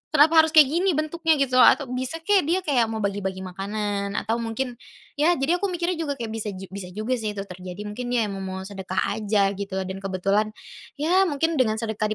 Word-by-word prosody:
kenapa 320 +3 +6
harus 320 - -6
kayak 295 -3 +8
gini 355 0 +2
bentuknya 320 +1 +1
gitu, 260 -3 +2
atau 265 0 +5
bisa 260 +6 -4
kek 385 -5 +3
dia 365 +2 +1
kayak 250 -8 +2
mau 220 -1 -4
bagi-bagi 190 -1 -2
makanan 200 +2 -3
atau 230 +2 -1
mungkin, 235 +2 -4 0.4
ya 340 +3 +4
jadi 320 +7 +1
aku 400 - 0
mikirnya 350 -1 -2
juga 285 -3 -2
kayak 230 -3 -5
bisa 225 -1 -4
ju 190 0 -10
bisa 195 -2 -6
juga 235 +3 -1
sih 210 -1 -3
itu 195 - -3
terjadi, 185 +1 -8
mungkin 220 +4 -5
ya 230 - +3
mau 190 -1 -5
sedekah 190 -1 -7 0.2
aja 200 -2 +2
gitu, 200 -1 -5
dan 190 +1 -6
kebetulan, 195 +2 0 0.5
ya 355 +6 +3
mungkin 320 0 0
dengan 220 -4 +3
sedekah 220 -1 -2
225 Hz, 205 wpm, -24 LUFS, 200-305 Hz, 0.5 s, kayak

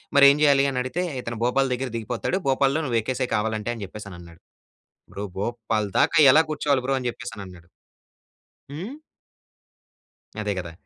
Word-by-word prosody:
"మరి 140 0 +8
ఏం 140 - 0
చేయాలి?" 140 -2 +5
అని 125 - -2
అడిగితే, 130 +8 -2 0.2
"ఇతను 115 -2 -5
భోపాల్ 135 +2 +1
దగ్గర 130 +1 -3
దిగిపోతాడు. 115 - -2
భోపాల్‌లో 135 +3 +2
నువ్వు 120 -3 +1
ఎక్కేసేయ్ 125 +2 -3
కావాలంటే" 110 +1 -1
అని 110 - -7
చెప్పేసి 105 +2 -10
అని 90 - -9
అన్నాడు. 85 -1 -15 0.7
"బ్రో! 100 - -4
భోపాల్ 110 -1 -2
దాకా - - +3 0.2
ఎలా 160 - +6
కూర్చోవాలి 140 -3 0
బ్రో 135 - +2
అని 125 - -2
చెప్పేసనన్నాడు. 95 -8 -10 1.0
హ్మ్. 190 - -6 1.4
అదే 105 -1 -1
కదా! 85 -2 -7
120 Hz, 155 wpm, -24 LUFS, 105-135 Hz, 1.4 s, మరి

